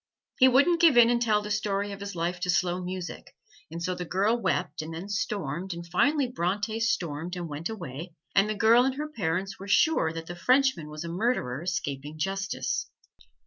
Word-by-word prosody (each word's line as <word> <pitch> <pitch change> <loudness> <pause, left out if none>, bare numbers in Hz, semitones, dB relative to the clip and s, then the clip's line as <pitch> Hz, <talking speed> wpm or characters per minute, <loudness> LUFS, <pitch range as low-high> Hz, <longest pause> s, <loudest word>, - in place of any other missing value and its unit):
He 260 - +8
wouldn't 285 +7 +4
give 320 -7 +6
in 235 0 +7
and 240 0 +1
tell 215 -3 +2
the 210 - -5
story 205 -1 -1
of 200 - -7
his 200 -1 -6
life 175 +1 -2
to 180 0 -3
slow 180 +1 +1
music, 180 0 -6 0.3
and 165 +2 -6
so 185 - 0
the 180 - -5
girl 195 +6 +1
wept 160 -10 -1
and 155 +1 -7
then 175 +4 -6
stormed, 190 -4 -3
and 170 0 -7
finally 275 - +2
Bronte 210 0 -2
stormed 175 -6 -1
and 175 -1 -4
went 150 +4 -4
away, 170 -5 -7 0.2
and 200 +1 +4
the 215 - -1
girl 225 +4 +5
and 265 0 0
her 300 +2 -4
parents 195 - -2
were 195 - -8
sure 315 - +3
that 165 0 -6
the 175 - -7
Frenchman 250 - +2
was 150 +1 -6
a - - -5
murderer 170 - -1
escaping 150 -4 -4
justice. 195 +4 -2
190 Hz, 200 wpm, -27 LUFS, 170-225 Hz, 0.3 s, He